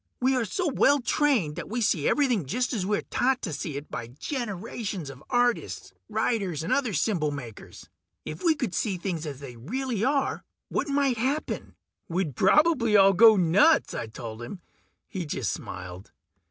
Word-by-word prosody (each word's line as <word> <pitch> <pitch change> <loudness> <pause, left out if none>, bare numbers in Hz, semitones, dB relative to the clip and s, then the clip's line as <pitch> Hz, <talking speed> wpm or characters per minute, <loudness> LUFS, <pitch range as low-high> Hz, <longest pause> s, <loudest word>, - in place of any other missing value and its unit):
We 260 +1 +2
are 250 -3 +1
so 355 - -2
well 285 0 +4
trained 245 - +1
that 170 - -6
we 235 +4 -2
see 180 -9 +2
everything 245 - +1
just 250 - -1
as 195 -5 -1
we 210 0 +2
are - - -4
taught 260 +1 +1
to 165 - -3
see 140 0 -4
it 145 - -9
by 115 - -5
generations 200 - -5
of 135 +1 -14
artists, 245 -1 0 0.2
writers, 210 -7 -1
and 165 - 0
other 260 -5 +1
symbol 175 -6 +1
makers. 130 -7 -9 0.4
If - - -7
we 330 -3 +4
could 250 - -3
see 200 -5 -1
things 170 -3 -3
as 140 -2 -7
they 125 -4 -9
really 230 - -3
are, 275 +2 0 0.3
what - - -1
might 280 -3 +1
happen?" 275 +6 -2 0.3
"We'd 170 -6 -1
probably 275 - +4
all 195 0 +6
go 220 +3 +8
nuts!" 190 - +4
I - - -4
told 110 0 -8
him. 125 +11 -7 0.5
He 185 - -4
just 135 - -2
smiled. 90 0 -8
205 Hz, 180 wpm, -27 LUFS, 150-255 Hz, 0.5 s, go